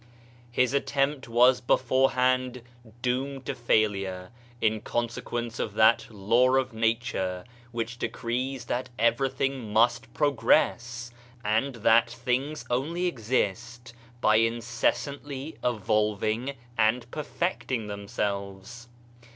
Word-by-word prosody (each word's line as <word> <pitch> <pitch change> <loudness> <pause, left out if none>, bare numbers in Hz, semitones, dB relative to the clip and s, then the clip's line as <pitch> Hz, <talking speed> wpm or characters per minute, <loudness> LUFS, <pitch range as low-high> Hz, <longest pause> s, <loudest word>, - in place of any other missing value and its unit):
His 125 +1 +1
attempt 140 0 0
was 125 +2 +5
beforehand 130 0 +2 0.4
doomed 130 +2 -1
to - - -2
failure, 100 -6 0 0.3
in 110 -1 +1
consequence 120 0 -3
of 105 - -3
that 110 +1 +5
law 115 +5 +3
of 130 -2 +1
nature 110 -5 -1 0.3
which 120 +1 -4
decrees 125 +2 -3
that 125 +1 -2
everything 130 +1 0
must 115 +3 +2
progress, 120 -3 +1 0.3
and 115 +6 +1
that 115 +1 +4
things 125 +5 -2
only 160 +9 -1
exist 120 - -2 0.3
by 110 -2 +5
incessantly 120 +5 -1
evolving 110 +3 0 0.2
and 115 +2 +2
perfecting 150 -6 -2
themselves. 100 +2 -4
120 Hz, 95 wpm, -27 LUFS, 110-130 Hz, 0.4 s, was